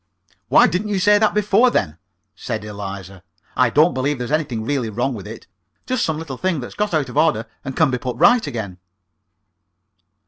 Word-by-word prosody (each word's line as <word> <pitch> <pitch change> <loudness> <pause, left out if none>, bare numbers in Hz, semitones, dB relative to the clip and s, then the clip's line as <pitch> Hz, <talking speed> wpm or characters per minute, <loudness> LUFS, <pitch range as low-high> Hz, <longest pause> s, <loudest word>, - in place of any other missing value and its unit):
"Why - - +6
didn't 185 +5 -1
you 205 -2 -1
say 205 +2 +4
that 215 -1 +2
before, 210 +4 +4
then?" 80 - -1 0.4
said - - -5
Eliza. 100 -2 -8 0.3
"I 125 -1 +3
don't 155 +8 +4
believe 135 +2 -1
there's 125 +2 -5
anything 135 -8 -1
really 135 -4 -1
wrong 120 +5 -1
with 105 -4 -8
it 110 +2 -10 0.4
just 255 -2 -1
some 160 -1 -1
little 150 -5 -6
thing 185 -2 -1
that's 120 - -7
got 210 -5 -1
out 145 -4 0
of 125 - -7
order, 130 -8 +2 0.2
and 135 -1 -6
can 155 -4 +3
be 125 - -1
put 125 -2 -4
right 240 - +4
again." 100 -6 -5
135 Hz, 195 wpm, -20 LUFS, 115-180 Hz, 0.4 s, Why